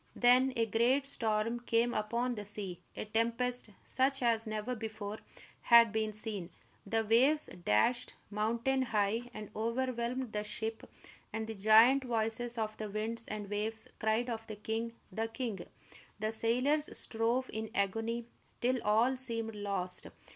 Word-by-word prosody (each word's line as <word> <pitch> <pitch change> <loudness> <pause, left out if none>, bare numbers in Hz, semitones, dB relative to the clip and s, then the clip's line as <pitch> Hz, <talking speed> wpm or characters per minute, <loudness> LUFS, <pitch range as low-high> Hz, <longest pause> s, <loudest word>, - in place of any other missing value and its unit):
Then 250 +2 +5
a 230 -1 +2
great 240 +6 +2
storm 225 -2 0
came 240 0 +1
upon 235 +4 0
the 210 -3 -5
sea, 200 -3 -5 0.2
a - - -3
tempest 230 +2 0 0.2
such 270 0 +1
as 225 -1 +2
never 215 +3 -2
before 215 -2 -5 0.4
had 235 -2 +7
been 220 0 0
seen. 210 -4 -3 0.4
The 225 +2 +1
waves 265 +8 +4
dashed 235 - +2 0.2
mountain 235 +5 +1
high 225 0 0
and 215 -3 -8
overwhelmed 240 +1 -1
the 210 0 -1
ship, 220 +1 -4 0.4
and 220 +1 -3
the 220 - -5
giant 220 +6 +6
voices 235 0 -1
of 215 -1 -2
the 215 -1 -4
winds 225 +3 -3
and 210 -1 -5
waves 215 +2 -3
cried 220 +3 +1
of 225 -1 -5
the 215 - -6
king, 225 +2 -3 0.2
the 225 +4 -1
king! 225 -6 -4 0.5
The 215 +1 -1
sailors 255 +7 +1
strove 235 +3 -1
in 220 0 -3
agony 225 +4 0 0.3
till 250 0 +1
all 225 +5 +3
seemed 230 -3 0
lost. 195 -3 -3
225 Hz, 145 wpm, -33 LUFS, 215-240 Hz, 0.5 s, had